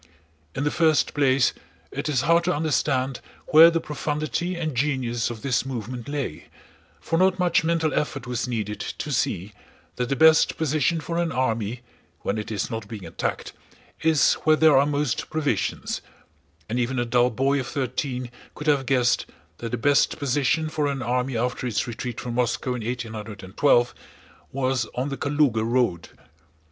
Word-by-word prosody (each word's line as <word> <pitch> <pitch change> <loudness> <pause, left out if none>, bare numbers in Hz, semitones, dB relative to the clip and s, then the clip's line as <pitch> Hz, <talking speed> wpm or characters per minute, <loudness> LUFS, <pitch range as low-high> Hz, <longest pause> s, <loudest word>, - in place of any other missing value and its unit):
In 135 - -1
the 150 - +1
first 160 -4 +2
place 135 -3 +3 0.4
it - - -3
is 130 -5 +2
hard 170 +3 +3
to 180 - +1
understand 135 -4 0 0.3
where 160 +2 +9
the 165 0 0
profundity 155 +3 -2
and 160 -3 -3
genius 125 -3 0
of 115 -2 -8
this 130 -4 +1
movement 120 -2 -5
lay, 135 - -4 0.5
for 165 - -1
not 185 0 +3
much 180 -3 +2
mental 160 -1 +1
effort 135 -4 -2
was 125 0 -2
needed 105 -4 -3
to 150 - -5
see 105 -7 -1 0.4
that 125 0 -1
the 135 - +1
best 160 +3 +5
position 155 +1 +1
for 170 +2 -3
an 170 -1 0
army 115 -3 -1 0.4
when 105 +2 -1
it 105 - -6
is 105 +2 -2
not 115 0 -4
being 105 -6 -8
attacked 80 - -4 0.5
is 160 -2 +4
where 155 0 +5
there 155 -2 +5
are 140 +2 +5
most 145 -2 -1
provisions; 145 -10 -1 0.7
and 120 +3 -2
even 125 +2 -1
a 120 - +1
dull 120 +1 +3
boy 135 +4 +1
of 130 - -4
thirteen 130 -2 -3 0.2
could 150 - -7
have 140 -4 +2
guessed 125 -3 +2 0.3
that 115 - -4
the 120 - -2
best 140 +4 +3
position 145 +3 +1
for 155 -1 -1
an 135 -2 -2
army 125 0 -1
after 125 +2 -1
its 115 - -1
retreat 120 0 -5
from 120 - -5
Moscow 125 +1 0
in 120 -3 -4
1812 115 +1 0 0.6
was 130 -3 0
on 130 +3 -1
the 135 - -4
Kalúga 140 -6 +1
road. 115 -7 0
130 Hz, 170 wpm, -24 LUFS, 120-150 Hz, 0.7 s, where